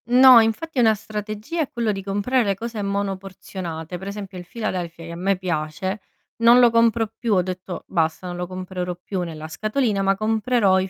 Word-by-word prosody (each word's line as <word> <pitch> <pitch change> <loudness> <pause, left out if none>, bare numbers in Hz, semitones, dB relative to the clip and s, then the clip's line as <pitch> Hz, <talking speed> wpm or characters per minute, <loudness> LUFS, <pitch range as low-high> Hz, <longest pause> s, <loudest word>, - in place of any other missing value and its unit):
No, 250 0 +9
infatti 230 +7 0
è - - +6
una 220 -2 +5
strategia 215 +8 -4
è 295 - -1
quello 235 -2 0
di 195 -1 -4
comprare 205 +6 +1
le 200 -2 0
cose 225 +1 -5
monoporzionate, 190 -4 -4
per 190 - -8
esempio 200 -2 -6
il 175 - -11
Philadelphia, 175 -7 -4
che 165 - -8
a - - -6
me 190 +2 0
piace, 185 +3 -3 0.4
non 235 +1 +7
lo 240 -2 +6
compro 230 0 +3
più, 230 -4 +1
ho 180 - +3
detto: 185 0 -6
"Basta, 165 0 0
non 175 -1 -4
lo 180 0 -4
comprerò 185 -1 -4
più 180 +1 -4
nella 160 -3 -6
scatolina, 215 - 0
ma 195 0 +3
comprerò 215 -1 +2
i 190 0 -2
195 Hz, 200 wpm, -23 LUFS, 180-225 Hz, 0.4 s, No